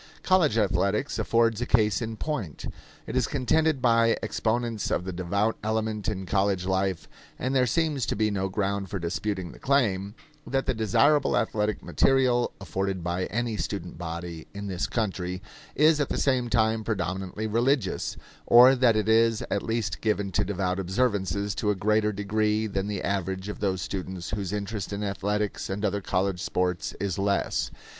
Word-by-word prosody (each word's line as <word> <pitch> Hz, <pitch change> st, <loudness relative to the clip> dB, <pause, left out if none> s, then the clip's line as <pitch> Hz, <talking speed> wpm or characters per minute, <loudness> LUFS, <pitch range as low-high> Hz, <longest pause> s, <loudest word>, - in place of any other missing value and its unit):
College 170 Hz, -, +3 dB
athletics 100 Hz, +6 st, +1 dB
afford 115 Hz, -1 st, +2 dB
a -, -, 0 dB
case 110 Hz, -2 st, +3 dB
in 110 Hz, -1 st, -4 dB
point. 115 Hz, -, -4 dB, 0.4 s
It -, -, -6 dB
is -, -, +2 dB
contended 150 Hz, +1 st, +1 dB
by 115 Hz, -1 st, +4 dB
exponents 115 Hz, -1 st, -1 dB
of 90 Hz, -, -1 dB
the 95 Hz, -, -4 dB
devout 100 Hz, +5 st, 0 dB
element 110 Hz, -1 st, -1 dB
in 95 Hz, -3 st, -2 dB
college 95 Hz, -1 st, +1 dB
life 95 Hz, -2 st, -1 dB, 0.3 s
and 130 Hz, +1 st, -2 dB
there 130 Hz, -1 st, +4 dB
seems 150 Hz, -2 st, 0 dB
to -, -, 0 dB
be 110 Hz, 0 st, +1 dB
no 95 Hz, -1 st, -1 dB
ground 100 Hz, 0 st, -2 dB
for 100 Hz, -, -3 dB
disputing 95 Hz, +1 st, -3 dB
the -, -, -14 dB
claim 105 Hz, -7 st, +1 dB, 0.3 s
that 135 Hz, 0 st, 0 dB
the -, -, +1 dB
desirable 135 Hz, +7 st, +3 dB
athletic 105 Hz, -1 st, -1 dB
material 130 Hz, -3 st, +2 dB
afforded 95 Hz, -2 st, -3 dB
by 90 Hz, +1 st, -1 dB
any 115 Hz, -1 st, -2 dB
student -, -, -4 dB
body 85 Hz, -1 st, -6 dB
in 100 Hz, 0 st, -5 dB
this 95 Hz, -2 st, -2 dB
country 90 Hz, -5 st, -2 dB, 0.4 s
is 155 Hz, +1 st, +5 dB
at 145 Hz, -, -1 dB
the -, -, -1 dB
same 130 Hz, -3 st, +1 dB
time 110 Hz, -1 st, +2 dB
predominantly 95 Hz, 0 st, -3 dB
religious; 115 Hz, 0 st, 0 dB, 0.3 s
or 125 Hz, +2 st, +8 dB
that 125 Hz, -3 st, +4 dB
it 110 Hz, 0 st, 0 dB
is 115 Hz, 0 st, +3 dB
at -, -, +1 dB
least 110 Hz, -9 st, -2 dB
given 105 Hz, -3 st, 0 dB
to -, -, +1 dB
devout 95 Hz, -2 st, -1 dB
observances 100 Hz, -1 st, 0 dB
to 105 Hz, -, -1 dB
a 105 Hz, -, +2 dB
greater 105 Hz, +2 st, +2 dB
degree 105 Hz, +2 st, 0 dB
than 100 Hz, -2 st, -2 dB
the 105 Hz, -2 st, -3 dB
average 95 Hz, 0 st, -2 dB
of 105 Hz, -, -6 dB
those 95 Hz, -3 st, -1 dB
students 95 Hz, -2 st, -5 dB
whose 100 Hz, -3 st, -3 dB
interest 105 Hz, -1 st, -4 dB
in 100 Hz, +1 st, -3 dB
athletics 105 Hz, +1 st, -2 dB
and 100 Hz, +2 st, -2 dB
other 100 Hz, 0 st, 0 dB
college 95 Hz, -1 st, -1 dB
sports 90 Hz, -1 st, -1 dB
is 100 Hz, -1 st, -2 dB
less. 100 Hz, 0 st, 0 dB
105 Hz, 170 wpm, -27 LUFS, 95-115 Hz, 0.4 s, or